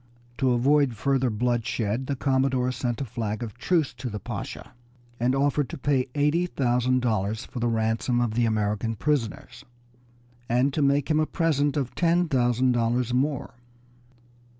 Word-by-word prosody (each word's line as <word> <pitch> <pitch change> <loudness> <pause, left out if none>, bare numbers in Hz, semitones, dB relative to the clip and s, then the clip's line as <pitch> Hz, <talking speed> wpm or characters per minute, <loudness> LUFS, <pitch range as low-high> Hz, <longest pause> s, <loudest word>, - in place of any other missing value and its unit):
To 130 - +2
avoid 135 +1 +3
further 135 +2 +1
bloodshed 120 +1 -1
the 140 - -1
commodore 130 -1 +1
sent 125 -1 -3
a - - -1
flag 110 0 -4
of 110 -3 -6
truce 165 -6 +1
to 125 +1 -6
the 105 -1 -5
Pasha, - - -7 0.5
and 125 +3 +2
offered 145 0 +1
to - - -6
pay 135 -2 +1
eighty 150 +5 +2
thousand 125 -3 +1
dollars 110 -2 -1
for 125 - -7
the 120 - 0
ransom 115 +2 0
of 120 -3 0
the 120 0 +2
American 110 +1 -1
prisoners, 125 - -2 0.9
and 125 +4 +2
to 155 - 0
make 140 +2 +2
him 155 - +3
a 155 - +1
present 145 -4 +1
of 135 -4 -2
ten 175 0 +2
thousand 125 -2 +2
dollars 120 +1 0
more. 135 +2 -1
125 Hz, 160 wpm, -26 LUFS, 115-140 Hz, 0.9 s, avoid